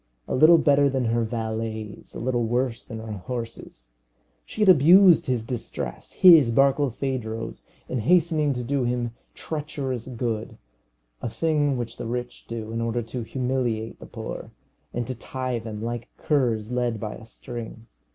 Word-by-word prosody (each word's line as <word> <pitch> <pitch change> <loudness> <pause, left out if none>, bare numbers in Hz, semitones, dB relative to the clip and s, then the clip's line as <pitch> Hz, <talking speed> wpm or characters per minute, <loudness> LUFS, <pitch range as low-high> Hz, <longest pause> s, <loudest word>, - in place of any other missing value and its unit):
A - - -3
little 160 +5 +7
better 145 -2 +4
than 130 -2 0
her 115 +1 +1
valets, 110 -1 -4
a - - -5
little 120 0 0
worse 120 +1 -1
than 115 - -6
her 110 0 -7
horses. 115 - -6 0.6
She 220 - -6
had - - +3
abused 175 +2 +7
his 125 -3 0
distress 120 0 -5
his, 160 -10 +7
Barkilphedro's 130 -3 0 0.2
in 130 - -2
hastening 155 +2 +3
to 125 -1 -4
do 135 +2 0
him 120 -1 -1 0.2
treacherous 140 -6 -4
good; 115 -3 -3 0.6
a - - -2
thing 145 0 +1
which 115 -1 -5
the 120 - -5
rich 120 +1 -5
do 110 -1 -5
in 115 0 -2
order 115 +1 -1
to 115 +2 -5
humiliate 120 -2 -2
the - - -11
poor, - - -7 0.4
and 120 0 -2
to 130 - -3
tie 130 0 -4
them, 110 -1 -6
like 120 0 -4
curs 120 -7 0
led 120 -3 0
by 105 0 -4
a 110 - -11
string. 115 -1 -8
120 Hz, 160 wpm, -25 LUFS, 115-135 Hz, 0.6 s, little